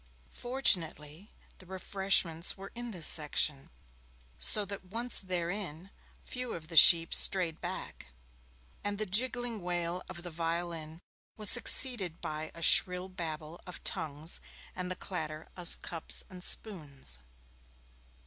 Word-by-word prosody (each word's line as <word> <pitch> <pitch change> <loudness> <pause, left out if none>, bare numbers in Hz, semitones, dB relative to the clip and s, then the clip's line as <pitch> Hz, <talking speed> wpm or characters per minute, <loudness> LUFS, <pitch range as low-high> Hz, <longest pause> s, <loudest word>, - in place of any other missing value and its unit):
Fortunately, 180 - 0 0.3
the 185 - -14
refreshments 190 -3 0
were 195 +1 -11
in 240 0 -8
this 175 -8 -2
section, 150 -2 +4 0.7
so 210 -1 +5
that 200 -1 -8
once 230 +6 +3
therein, 180 -1 -5 0.3
few 250 -1 -5
of 155 -1 -11
the 165 - -8
sheep 165 0 +6
strayed 170 -4 +2
back, - - -8 0.8
and 205 0 -4
the 215 - -2
jiggling 240 +2 -1
wail 175 0 -4
of 175 -2 -9
the 175 - -7
violin 165 0 -5 0.4
was 210 -3 -1
succeeded 240 - +4
by 155 +1 -6
a 170 - -8
shrill 180 +2 +4
babble 160 -3 -8
of 180 - -10
tongues 155 +2 +2 0.3
and 180 0 -5
the 185 - -5
clatter 155 -4 -7
of 175 -2 -10
cups 165 -2 -2
and 180 -1 -10
spoons. 145 - -2
180 Hz, 130 wpm, -30 LUFS, 160-195 Hz, 0.8 s, sheep